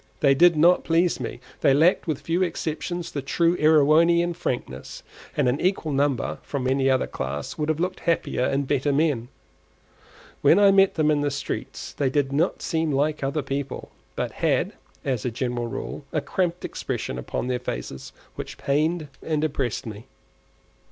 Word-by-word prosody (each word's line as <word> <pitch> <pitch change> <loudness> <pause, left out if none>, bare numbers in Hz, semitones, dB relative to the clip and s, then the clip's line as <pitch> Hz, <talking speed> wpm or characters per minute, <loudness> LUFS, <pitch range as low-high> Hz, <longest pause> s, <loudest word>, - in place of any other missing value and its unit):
They 140 -2 +5
did 170 +3 +5
not 175 +4 +5
please 170 +1 +2
me; - - -5 0.2
they 135 - +4
lacked, 170 +5 +3
with 155 -4 -2
few 170 +2 -1
exceptions, 175 0 -3
the 140 - -3
true 170 +5 +1
Erewhonian 160 +3 +4
frankness; 165 -7 -5 0.3
and 145 -4 +3
an 125 +3 0
equal 180 -4 0
number 140 -2 0
from 140 -3 -4
any 135 +1 +2
other 130 -1 +2
class 70 +2 -5
would 150 0 -2
have 155 0 0
looked 185 +2 -2
happier 165 -6 0
and 135 +1 0
better 145 +1 +1
men. 140 -5 +1 1.1
When 170 - +6
I 200 -1 +6
met 195 0 +4
them 155 -1 +3
in 145 -1 +2
the 145 - +1
streets 140 0 -5
they 140 -2 0
did 140 0 0
not 160 +6 0
seem 160 -2 0
like 145 +2 0
other 140 +2 -1
people, 140 0 -4 0.2
but - - -2
had, - - 0 0.3
as 130 -5 -1
a 125 - 0
general 120 0 -2
rule, 115 - -6
a 155 - +1
cramped 175 +3 -2
expression 60 - -4
upon 65 - -3
their 125 -1 -1
faces 65 - -6 0.2
which - - -7
pained 155 +3 0
and 155 -2 -1
depressed 135 -5 -2
me. 110 0 -8
150 Hz, 170 wpm, -24 LUFS, 135-165 Hz, 1.1 s, When